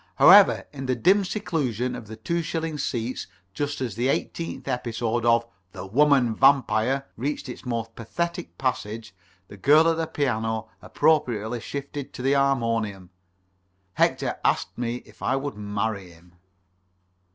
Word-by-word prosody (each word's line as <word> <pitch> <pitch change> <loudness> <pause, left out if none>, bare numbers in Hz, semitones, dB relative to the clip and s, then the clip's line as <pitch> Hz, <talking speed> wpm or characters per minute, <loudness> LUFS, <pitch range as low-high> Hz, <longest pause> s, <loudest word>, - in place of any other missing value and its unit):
However, - - +7
in 135 -2 -6
the 130 - +1
dim 190 - +4
seclusion 140 - -2
of 110 - -9
the 110 - -8
two 170 +10 -2
shilling 160 -1 -3
seats 120 -1 -3 0.3
just 145 +2 -3
as 120 -5 -2
the 120 +5 -1
eighteenth 165 +4 -3
episode 120 -2 -1
of 115 0 +4 0.3
"The - - -7
Woman 130 +2 +3
Vampire" 135 0 +3
reached 140 +6 -3
its 125 0 -8
most 115 -2 -3
pathetic 170 +10 -4
passage, 115 -4 -3 0.3
and 90 - -43
the 100 - -11
girl 150 +10 +5
at 165 -1 +2
the 165 -1 -1
piano 110 -6 -1
appropriately 120 -7 +1
shifted 140 +2 -6
to 125 - -7
the 135 +1 +3
harmonium, 115 -9 0 0.8
Hector - - +1
asked - - +1
me 120 0 -3
if 105 - -19
I 130 - +1
would 140 +1 -3
marry 105 -2 -3
him. 85 +1 -19
125 Hz, 150 wpm, -25 LUFS, 110-145 Hz, 0.8 s, However